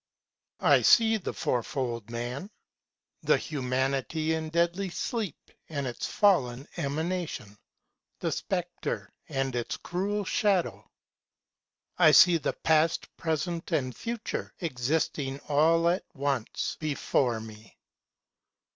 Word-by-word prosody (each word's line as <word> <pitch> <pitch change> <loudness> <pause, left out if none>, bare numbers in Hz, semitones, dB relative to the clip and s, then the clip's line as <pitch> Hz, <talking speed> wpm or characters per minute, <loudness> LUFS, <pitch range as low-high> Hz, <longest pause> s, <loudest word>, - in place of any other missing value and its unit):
I - - +6
SEE 225 -1 +6
the 200 - -4
Fourfold 120 -2 -2
Man; 120 - -4 0.7
the - - +4
Humanity 135 +3 -1
in 160 -1 -2
deadly 170 +4 +1
sleep, 210 - -4 0.2
And 140 -3 -3
its 120 -2 -3
fallen 140 - +2
Emanation, 155 - -3 0.6
the - - -2
Spectre - - -3 0.2
and 135 -1 -1
its 120 -1 -2
cruel 200 +3 -2
Shadow.I 125 - -1
see 175 -2 +8
the 145 - -1
Past, 160 +1 +1
Present, 165 +2 -2
and 130 -5 0
Future 235 -1 -4
existing 140 -2 -1
all 165 +3 +3
at 175 +2 +2
onceBefore 135 -2 -1
me. 110 -1 -13
150 Hz, 100 wpm, -28 LUFS, 125-175 Hz, 0.7 s, see